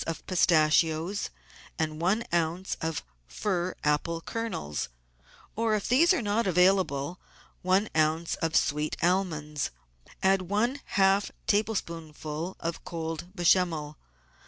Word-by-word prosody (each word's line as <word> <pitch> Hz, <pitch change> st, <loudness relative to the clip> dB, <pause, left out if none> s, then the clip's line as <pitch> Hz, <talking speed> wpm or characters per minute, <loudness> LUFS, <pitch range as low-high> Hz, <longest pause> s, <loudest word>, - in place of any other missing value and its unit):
of 165 Hz, -, -4 dB
pistachios 165 Hz, +1 st, +2 dB, 0.5 s
and 155 Hz, 0 st, -2 dB
one 200 Hz, +7 st, +2 dB
oz. 170 Hz, +2 st, 0 dB
of 160 Hz, -1 st, -2 dB, 0.2 s
fir 180 Hz, -, -2 dB
apple 150 Hz, +3 st, +1 dB
kernels, 165 Hz, -, -4 dB, 0.7 s
or, 225 Hz, -1 st, +1 dB
if 205 Hz, -, -2 dB
these 300 Hz, +8 st, +5 dB
are 365 Hz, -10 st, +2 dB
not 210 Hz, +1 st, +1 dB
available, 180 Hz, -4 st, +2 dB, 0.4 s
one 190 Hz, +3 st, +2 dB
oz. 155 Hz, +2 st, +1 dB
of 160 Hz, -1 st, 0 dB
sweet 150 Hz, +1 st, +1 dB
almonds; 160 Hz, -5 st, 0 dB, 0.5 s
add 190 Hz, 0 st, +4 dB
one 215 Hz, +9 st, 0 dB, 0.2 s
half 195 Hz, +1 st, +4 dB, 0.2 s
table 215 Hz, +2 st, +2 dB
spoonful 160 Hz, 0 st, -5 dB
of 165 Hz, 0 st, -4 dB
cold 165 Hz, +1 st, -5 dB
Bechamel. 170 Hz, -4 st, +2 dB
175 Hz, 115 wpm, -28 LUFS, 155-195 Hz, 0.7 s, these